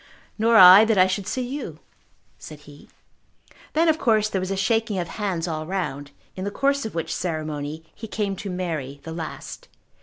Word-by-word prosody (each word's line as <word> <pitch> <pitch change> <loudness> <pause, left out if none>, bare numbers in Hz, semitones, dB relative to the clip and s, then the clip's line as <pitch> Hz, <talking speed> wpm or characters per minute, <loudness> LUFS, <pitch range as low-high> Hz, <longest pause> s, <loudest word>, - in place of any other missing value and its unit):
"Nor 230 +1 +4
I, 185 +2 +10
that 220 -2 +1
I 185 - +6
should 190 +1 -3
see 255 -1 -2
you," 280 +3 -6 0.6
said 150 -1 -11
he. 145 -1 -16 0.8
Then 325 +2 +2
of 320 0 +2
course 215 -2 +2
there 190 -3 -2
was 185 - -4
a 195 - -1
shaking 220 +1 0
of 175 -2 -2
hands 185 -5 -3
all 155 -1 -4
round, 150 -7 -4 0.3
in 185 - -5
the 200 - -2
course 275 +4 0
of 220 - -11
which 165 -1 -3
ceremony 155 -2 -4
he 225 - -9
came 205 -1 -2
to 200 - -6
Mary 160 -7 -4
the 160 - -7
last. 165 -1 -7
185 Hz, 190 wpm, -23 LUFS, 160-220 Hz, 0.8 s, I